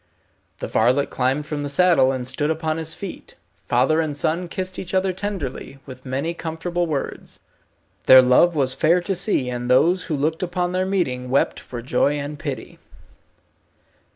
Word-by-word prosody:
The -, -, -5 dB
varlet 125 Hz, +6 st, +1 dB
climbed 135 Hz, +3 st, 0 dB
from 150 Hz, -1 st, -4 dB
the 145 Hz, -, -3 dB
saddle, 165 Hz, -3 st, +4 dB
and 130 Hz, -2 st, -4 dB
stood 145 Hz, +3 st, -1 dB
upon 160 Hz, 0 st, -1 dB
his 160 Hz, 0 st, -3 dB
feet. 195 Hz, -3 st, -9 dB, 0.3 s
Father 135 Hz, +7 st, +2 dB
and 150 Hz, -3 st, -3 dB
son 170 Hz, +4 st, -1 dB
kissed 185 Hz, +2 st, -5 dB
each 185 Hz, 0 st, -5 dB
other 190 Hz, 0 st, +1 dB
tenderly, 180 Hz, -9 st, -5 dB
with 130 Hz, -1 st, -11 dB
many 140 Hz, +6 st, -2 dB
comfortable 170 Hz, +1 st, -3 dB
words. 145 Hz, -4 st, -5 dB, 0.7 s
Their 130 Hz, 0 st, +9 dB
love 130 Hz, +7 st, +4 dB
was 135 Hz, -3 st, +2 dB
fair 165 Hz, +5 st, +3 dB
to 195 Hz, +3 st, -2 dB
see, 180 Hz, -, +1 dB
and 125 Hz, 0 st, -4 dB
those 170 Hz, +8 st, +3 dB
who 160 Hz, -, -2 dB
looked 155 Hz, +3 st, -1 dB
upon 180 Hz, 0 st, -1 dB
their 185 Hz, +1 st, -1 dB
meeting, 130 Hz, -10 st, -1 dB
wept 135 Hz, -, +1 dB
for 120 Hz, -2 st, -8 dB
joy 140 Hz, +3 st, +1 dB
and 145 Hz, 0 st, -5 dB
pity. -, -, -6 dB
155 Hz, 170 wpm, -22 LUFS, 130-175 Hz, 0.7 s, Their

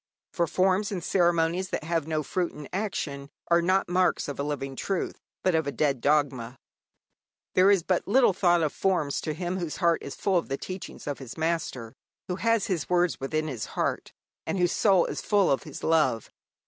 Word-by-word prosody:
For 170 Hz, -2 st, +1 dB
forms 190 Hz, +4 st, +1 dB
and 180 Hz, -4 st, -3 dB
ceremonies 175 Hz, 0 st, +2 dB
that -, -, -3 dB
have 165 Hz, -1 st, -1 dB
no 155 Hz, -1 st, -1 dB
fruit 175 Hz, +4 st, -2 dB
in 150 Hz, -2 st, -9 dB
action 150 Hz, -9 st, -3 dB, 0.2 s
are 170 Hz, 0 st, +5 dB
not 185 Hz, +3 st, +2 dB
marks 180 Hz, +1 st, +1 dB
of 145 Hz, -, -6 dB
a -, -, 0 dB
living 135 Hz, -2 st, -3 dB
truth, 190 Hz, +6 st, -3 dB, 0.2 s
but 185 Hz, -, +2 dB
of 160 Hz, -2 st, +1 dB
a -, -, 0 dB
dead 140 Hz, -4 st, 0 dB
dogma. 135 Hz, -4 st, +1 dB, 1.0 s
There 185 Hz, +2 st, +5 dB
is 195 Hz, -4 st, +4 dB
but 185 Hz, 0 st, 0 dB
little 240 Hz, 0 st, +4 dB
thought 175 Hz, -2 st, +3 dB
of 150 Hz, -, 0 dB
forms 170 Hz, -7 st, 0 dB
to 155 Hz, -, -3 dB
him 180 Hz, +2 st, -3 dB
whose 170 Hz, -4 st, -4 dB
heart 170 Hz, -2 st, +2 dB
is 140 Hz, -, -7 dB
full 190 Hz, -3 st, +2 dB
of 165 Hz, -, -8 dB
the 135 Hz, -, -1 dB
teaching 185 Hz, +4 st, -7 dB
of 145 Hz, -1 st, -4 dB
his 130 Hz, 0 st, -9 dB
Master, 160 Hz, -8 st, -2 dB, 0.3 s
who 180 Hz, -, -3 dB
has 230 Hz, 0 st, +2 dB
His 175 Hz, -6 st, -2 dB
words 180 Hz, -1 st, +2 dB
within 155 Hz, +3 st, -2 dB
his 130 Hz, -7 st, -4 dB
heart, -, -, -1 dB, 0.4 s
and -, -, -1 dB
whose 175 Hz, -1 st, +2 dB
soul 195 Hz, -5 st, +4 dB
is -, -, -4 dB
full 205 Hz, -3 st, +3 dB
of 135 Hz, -, 0 dB
His 150 Hz, -, -9 dB
love. 155 Hz, -9 st, +2 dB
170 Hz, 200 wpm, -27 LUFS, 145-185 Hz, 1.0 s, are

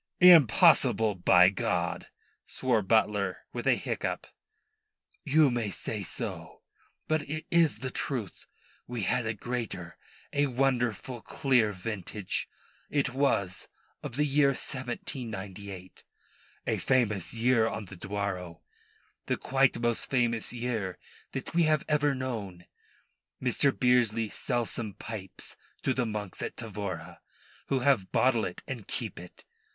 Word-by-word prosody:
"Impossible, 140 Hz, -, +7 dB
by 90 Hz, 0 st, +6 dB
God," 90 Hz, -4 st, -1 dB, 0.4 s
swore 125 Hz, -4 st, +1 dB
Butler, 100 Hz, -2 st, +1 dB
with -, -, -4 dB
a -, -, +6 dB
hiccup. -, -, -3 dB, 1.0 s
"You 150 Hz, -1 st, +4 dB
may 120 Hz, -3 st, -1 dB
say 95 Hz, -, -4 dB
so; -, -, -6 dB, 0.4 s
but 155 Hz, 0 st, +2 dB
it 155 Hz, +1 st, -4 dB
is 165 Hz, -9 st, +4 dB
the 130 Hz, -, -2 dB
truth. 120 Hz, -11 st, -4 dB, 0.4 s
We 120 Hz, -3 st, -3 dB
had 120 Hz, +4 st, +1 dB
a 110 Hz, -, -1 dB
greater; 110 Hz, -7 st, -5 dB, 0.4 s
a 145 Hz, 0 st, +3 dB
wonderful, 125 Hz, -2 st, 0 dB
clear 125 Hz, -7 st, +2 dB
vintage 100 Hz, 0 st, -4 dB, 0.4 s
it 135 Hz, -3 st, 0 dB
was, 100 Hz, -9 st, 0 dB, 0.3 s
of 120 Hz, -, -6 dB
the 150 Hz, +2 st, +2 dB
year 145 Hz, 0 st, +4 dB
1798 105 Hz, -8 st, -5 dB, 0.6 s
a -, -, 0 dB
famous 115 Hz, -7 st, +1 dB
year 115 Hz, -1 st, +3 dB
on 110 Hz, -, -4 dB
the 95 Hz, -, -10 dB
Douro, 95 Hz, -3 st, -4 dB, 0.6 s
the -, -, +1 dB
quite 135 Hz, 0 st, +2 dB
most 120 Hz, -1 st, 0 dB
famous 120 Hz, -3 st, +1 dB
year 115 Hz, -6 st, -3 dB, 0.4 s
that 135 Hz, -, -5 dB
we 170 Hz, -, +3 dB
have 155 Hz, -2 st, +2 dB
ever 145 Hz, -2 st, +2 dB
known. 105 Hz, -9 st, -5 dB, 0.7 s
Mr. 130 Hz, +2 st, +2 dB
Bearsley 120 Hz, -4 st, +2 dB
sell 120 Hz, 0 st, -1 dB
some 110 Hz, -3 st, -5 dB
pipes 95 Hz, -5 st, -6 dB, 0.3 s
to 130 Hz, -, +2 dB
the 125 Hz, -2 st, 0 dB
monks 105 Hz, -3 st, -5 dB
at -, -, -4 dB
Tavora, 95 Hz, -7 st, -6 dB, 0.5 s
who 135 Hz, -2 st, +1 dB
have 125 Hz, -8 st, +2 dB
bottle 120 Hz, -3 st, +3 dB
it 90 Hz, -, -6 dB
and 120 Hz, -6 st, -6 dB
keep -, -, -4 dB
it. 90 Hz, +1 st, -13 dB
115 Hz, 130 wpm, -29 LUFS, 100-130 Hz, 1.0 s, Impossible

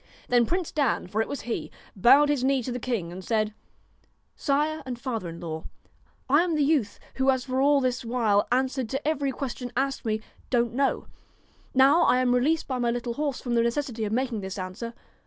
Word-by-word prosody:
Then 240 Hz, -2 st, +4 dB
Prince 360 Hz, -2 st, -1 dB
Dan, 285 Hz, -6 st, +1 dB
for 210 Hz, +4 st, -1 dB
it -, -, -1 dB
was 285 Hz, -, -5 dB
he, 240 Hz, -, -4 dB, 0.3 s
bowed 270 Hz, +9 st, +6 dB
his 285 Hz, -4 st, +1 dB
knee 265 Hz, -1 st, +2 dB
to 250 Hz, -, -4 dB
the 245 Hz, -, -3 dB
king, 220 Hz, -9 st, -2 dB
and 185 Hz, +2 st, -8 dB
said: 215 Hz, 0 st, 0 dB, 0.4 s
' -, -, -41 dB
Sire 300 Hz, +2 st, +1 dB
and 250 Hz, -2 st, -5 dB
father 230 Hz, -8 st, -3 dB
in 165 Hz, 0 st, -8 dB
law, 160 Hz, -2 st, -6 dB, 0.6 s
I 290 Hz, +4 st, +5 dB
am 345 Hz, -2 st, 0 dB
the 300 Hz, -, +2 dB
youth 275 Hz, -9 st, +1 dB, 0.2 s
who 265 Hz, 0 st, +2 dB
has 260 Hz, -1 st, +2 dB
for 260 Hz, 0 st, 0 dB
all 285 Hz, +1 st, +5 dB
this 255 Hz, -1 st, -1 dB
while 225 Hz, -4 st, +2 dB
answered 260 Hz, -1 st, 0 dB
to 270 Hz, +4 st, -3 dB
every 285 Hz, -3 st, 0 dB
question 250 Hz, -2 st, -5 dB
asked 270 Hz, 0 st, 0 dB
me, 220 Hz, -2 st, 0 dB, 0.3 s
Don't 235 Hz, -2 st, +1 dB
know. 275 Hz, +2 st, 0 dB, 0.7 s
Now 270 Hz, +6 st, +6 dB
I 250 Hz, -, +4 dB
am 255 Hz, -1 st, +2 dB
re 250 Hz, -, +3 dB
leased 315 Hz, +4 st, +1 dB
by 255 Hz, -2 st, -2 dB
my 240 Hz, -1 st, +1 dB
little 240 Hz, 0 st, -2 dB
horse 285 Hz, 0 st, -2 dB
from 245 Hz, -, -3 dB
the 235 Hz, -, +4 dB
necessity 235 Hz, -1 st, -1 dB
of 210 Hz, -, -2 dB
making 240 Hz, -2 st, -1 dB
this 190 Hz, +1 st, -6 dB
answer. 195 Hz, +5 st, -6 dB
250 Hz, 215 wpm, -26 LUFS, 230-275 Hz, 0.7 s, bowed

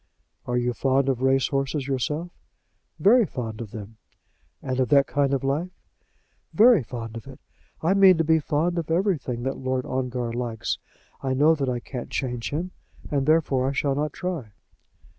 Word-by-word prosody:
"Are 125 Hz, 0 st, 0 dB
you 125 Hz, 0 st, 0 dB
fond 135 Hz, +2 st, +1 dB
of 130 Hz, -2 st, -1 dB
race 135 Hz, 0 st, +2 dB
horses 135 Hz, 0 st, -1 dB
yourself?" 150 Hz, +6 st, -2 dB, 0.7 s
"Very 235 Hz, +5 st, +5 dB
fond 115 Hz, -, -5 dB
of 110 Hz, -, -6 dB
them." 110 Hz, 0 st, -9 dB, 0.6 s
"And 130 Hz, -1 st, -3 dB
of 130 Hz, -, +1 dB
that 140 Hz, -1 st, +5 dB
kind 140 Hz, 0 st, 0 dB
of 135 Hz, -1 st, 0 dB
life?" 145 Hz, +7 st, -1 dB, 0.9 s
"Very 225 Hz, -3 st, +7 dB
fond 115 Hz, -1 st, -7 dB
of 115 Hz, -, -8 dB
it. -, -, -11 dB, 0.4 s
I 170 Hz, +4 st, +3 dB
mean 195 Hz, -3 st, +6 dB
to 165 Hz, -, +2 dB
be 160 Hz, 0 st, +3 dB
fond 160 Hz, +4 st, 0 dB
of 160 Hz, -, -5 dB
everything 160 Hz, -, 0 dB
that 135 Hz, +1 st, -2 dB
Lord 130 Hz, -1 st, -2 dB
Ongar 125 Hz, -2 st, -2 dB
likes. 120 Hz, -2 st, -3 dB, 0.4 s
I 130 Hz, -1 st, -1 dB
know 150 Hz, +4 st, +5 dB
that 140 Hz, -4 st, -1 dB
I 125 Hz, -1 st, -1 dB
can't 125 Hz, 0 st, -7 dB
change 125 Hz, -3 st, -3 dB
him, 170 Hz, +5 st, -3 dB, 0.4 s
and, 140 Hz, -1 st, 0 dB
therefore, 140 Hz, -5 st, +2 dB
I -, -, -2 dB
shall 140 Hz, 0 st, 0 dB
not 150 Hz, +2 st, -1 dB
try." 160 Hz, -, -5 dB
135 Hz, 180 wpm, -25 LUFS, 125-155 Hz, 0.9 s, Very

